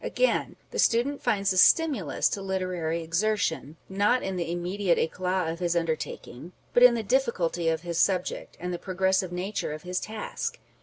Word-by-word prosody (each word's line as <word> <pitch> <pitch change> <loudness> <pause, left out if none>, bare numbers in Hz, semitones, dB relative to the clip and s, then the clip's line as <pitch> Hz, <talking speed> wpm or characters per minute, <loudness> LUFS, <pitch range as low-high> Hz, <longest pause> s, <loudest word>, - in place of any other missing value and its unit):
Again, - - 0 0.2
the - - -4
student 255 +5 +2
finds 195 -2 +1
a 185 - +2
stimulus 275 - +4
to 200 - -4
literary 180 -4 -2
exertion, 170 -3 -1
not 205 +6 +1
in 190 -1 -3
the 170 -2 -2
immediate 175 +1 0
eclat 180 +2 -1
of 165 - -10
his 175 -1 0
undertaking, 165 -2 -4 0.2
but 245 - +4
in 250 -1 +8
the 225 - -2
difficulty 190 -9 0
of 160 0 -1
his 170 -1 -3
subject, 185 -2 0
and 180 0 -4
the 175 - -4
progressive 190 -1 0
nature 180 -2 -3
of 155 - -8
his 180 0 -2
task. 215 0 -5
185 Hz, 170 wpm, -27 LUFS, 170-205 Hz, 0.2 s, in